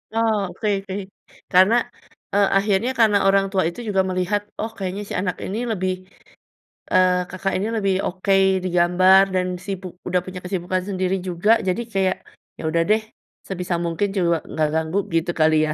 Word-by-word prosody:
Oh, 220 -4 +1
oke 215 - -3 0.2
oke. 190 - -4 0.6
Karena, 190 +5 +6 0.6
eee, 200 -1 +4
akhirnya 205 +4 +1
karena 215 -3 +5
orang 195 0 +4
tua 190 -3 +1
itu 175 - -10
juga 195 -2 +2
melihat, 185 +3 0 0.2
"Oh, 220 +1 -3
kayaknya 195 +1 -4
si - - -12
anak 185 -1 -1
ini 200 +4 -4
lebih," 185 -2 -1 1.0
eee, 185 0 +5 0.2
Kakak 190 +1 -3
ini 205 +3 -1
lebih 195 -2 +1
oke 190 +2 -1 0.3
di 185 - -1
gambar 185 +2 +6
dan 180 0 +1 0.2
sibuk 190 -2 -5 0.2
udah 180 0 +1
punya 185 0 -7
kesibukan 180 0 -2
sendiri 185 -1 0
juga. 180 +5 +1 0.2
Jadi, 185 +6 0
kayak 190 -1 +1 0.4
ya - - -9
udah 165 +1 +1
deh, 215 +1 +4 0.5
sebisa 180 -2 -3
mungkin 170 +5 0
juak 170 -3 +2
nggak 155 -1 0
ganggu 160 +4 -1 0.2
gitu 165 +1 +1
kali, 155 0 +4
ya. - - -1
185 Hz, 170 wpm, -22 LUFS, 180-200 Hz, 1.0 s, Karena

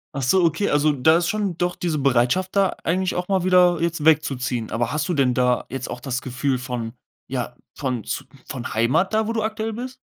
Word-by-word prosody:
Ach 140 - -2
so, 180 +9 +3
okay, 165 +6 +1
also, 145 +1 +3
da 160 +5 +4
ist 175 - 0
schon 200 -5 -1
doch 175 0 0
diese 170 -3 -2
Bereitschaft 135 +8 +1
da 195 -1 +4
eigentlich 185 +2 0
auch 180 0 -2
mal 190 -2 +1
wieder 180 -2 +4
jetzt 170 -2 -1
wegzuziehen. 130 -7 +1
Aber 115 +1 -1
hast 150 0 -1
du - - +1
denn 135 -5 +2
da 125 -1 +1
jetzt 130 -1 -5
auch - - -5
das 130 0 -3
Gefühl 130 +1 -1
von 120 -3 -4 0.4
ja, 125 -2 -3 0.2
von 125 -6 -3
z - - -4 0.2
von 120 -3 -5
Heimat 130 - +2
da, 220 0 +2
wo 230 - -1
du 220 -2 -1
aktuell 220 0 -2
bist? 255 +3 -6
155 Hz, 220 wpm, -22 LUFS, 125-185 Hz, 0.4 s, da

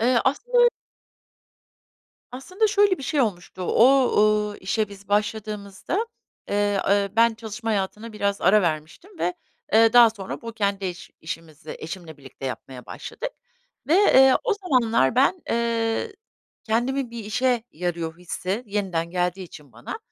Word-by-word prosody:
Eee, 245 +1 +3
aslı 485 - +3 1.6
Aslında 370 - -1
şöyle 405 -2 +3
bir - - -8
şey 290 +2 0
olmuştu, 185 -5 -2
o, 255 +6 +4 0.4
ııı, 205 - -8
işe 210 +3 -1
biz 200 0 -14
başladığımızda, 210 - -2 0.4
eee, 205 -1 +1
eee, 200 0 +2
ben 230 0 +5
çalışma 225 +1 -5
hayatına 210 +2 -3
biraz 200 -1 -1
ara 210 0 +5
vermiştim 160 - -4
ve, 175 +1 -1 0.4
eee, 225 +1 +6
daha 240 -2 +8
sonra 195 -3 -7
bu 230 - -6
kendi 200 -3 -1
iş 180 -1 -7
işimizi 160 -2 -8
eşimle 165 -1 -8
birlikte 135 -1 -9
yapmaya 130 0 -7
başladık - - -6 0.6
ve, 315 - +3
eee, 265 -9 +6
o 455 -4 +2
zamanlar 245 - +2
ben, 280 +7 +2
eee, 230 - -1 0.5
kendimin 245 +3 -1
bir 230 -3 -7
işe 245 +2 +1
yarıyor 170 -1 -4
hissi 185 +5 -4
yeniden 185 -5 -2
geldiği 180 +1 -1
için 150 -6 -14
bana, - - -7
215 Hz, 140 wpm, -24 LUFS, 185-250 Hz, 1.6 s, daha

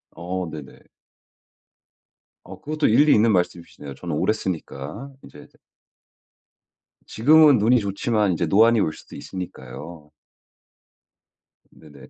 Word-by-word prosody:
어 90 +1 -5
네네. 75 -5 -11 1.7
어 - - -12
그것도 155 +1 -1
일리 145 +7 +4
있는 110 +1 +3
말씀이시네요. 85 -6 -3
저는 85 +1 -5
오래 105 - +1
쓰니까 95 - -6
이제 75 - -14 1.6
지금은 150 +4 +5
눈이 120 +4 +3
좋지만 105 0 -1
이제 85 0 -1
노안이 110 +6 +4
올 80 - -1
수도 - - -14
있으니까요. 85 -3 -9 1.6
네네. 75 -3 -16
95 Hz, 245 characters per minute, -22 LUFS, 80-115 Hz, 1.7 s, 지금은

